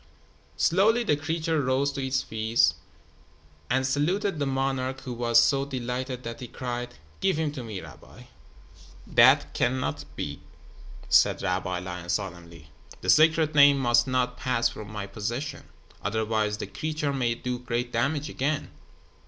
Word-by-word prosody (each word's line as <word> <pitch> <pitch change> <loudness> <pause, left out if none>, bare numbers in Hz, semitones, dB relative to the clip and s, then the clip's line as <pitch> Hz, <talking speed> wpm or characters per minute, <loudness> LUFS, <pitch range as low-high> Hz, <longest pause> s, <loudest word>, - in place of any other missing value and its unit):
Slowly 220 +7 +3
the 175 -10 +2
creature 160 +1 -1
rose 135 +2 +1
to 135 -1 -4
its 130 0 0
feet 110 +1 +2 1.0
and 130 0 +1
saluted 160 +7 0
the 140 - 0
monarch 135 -1 -1
who 130 -2 -6
was 115 -1 +3
so 125 +4 +3
delighted 130 -1 -4
that 115 0 -6
he 125 - -7
cried: 120 0 -5 0.2
"Give 190 -4 +1
him 160 -2 0
to 135 -4 -7
me, 110 -5 -6
rabbi." 80 -5 -13 0.8
"That - - +5
cannot 130 +1 -1
be," 70 0 -5 0.7
said - - +4
Rabbi 90 -1 -1
Lion, 90 -1 -7
solemnly. 85 -5 -5 0.3
"The - - +3
Sacred 155 0 +4
Name 145 -1 +7
must 120 -2 +3
not 125 -1 0
pass 120 -3 +1
from 110 -2 -9
my 105 -2 -5
possession. 120 +8 -5 0.4
Otherwise 110 -1 -1
the - - -4
creature 150 +8 -3
may 120 -3 0
do 125 +1 -4
great 120 0 -3
damage 140 +5 0
again. 145 +1 -2
125 Hz, 145 wpm, -27 LUFS, 115-140 Hz, 1.0 s, Name